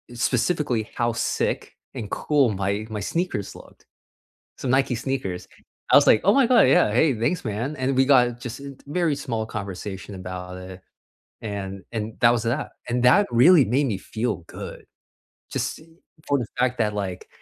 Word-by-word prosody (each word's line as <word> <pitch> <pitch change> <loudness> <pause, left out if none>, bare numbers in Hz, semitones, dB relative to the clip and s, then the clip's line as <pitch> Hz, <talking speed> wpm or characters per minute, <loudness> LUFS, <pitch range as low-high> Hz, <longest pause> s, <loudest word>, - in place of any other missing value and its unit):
specifically 125 -2 0
how 120 0 +1
sick - - -2 0.2
and 105 - -5
cool 145 -5 +2
my 100 +2 -2
my 105 -1 -4
sneakers 165 - -2
looked. - - -16 0.7
Some 130 - -4
Nike 135 -1 +2
sneakers. 120 -8 -3 0.4
I - - +7
was - - +5
like, 110 - +6
"Oh 200 - +6
my 275 -3 +5
god, 250 -3 +6
yeah, 105 - +4
hey, 140 +4 +4
thanks, 155 +9 0
man," 115 +8 -3
and 130 +1 0
we 130 - +5
got 125 -3 +4
just 125 +2 -6
in 140 -1 -9
t - - -24
very 165 -1 0
small 115 -5 -3
conversation 100 0 -6
about 90 0 -7
it, 95 0 -10 0.7
and 100 -2 -5
and 110 -1 -4
that 120 - +7
was 115 -1 -1
that, 135 +6 -2 0.2
and 120 +1 0
that 200 +12 +6
really 140 +6 +6
made 135 +5 +1
me 100 -6 -2
feel 110 -3 -3
good. - - -9 0.7
Just - - -2 0.5
for 140 - +2
the 120 - -4
fact 125 0 +1
that, 105 -2 +1
like, 95 -3 -4
120 Hz, 175 wpm, -24 LUFS, 105-135 Hz, 0.7 s, I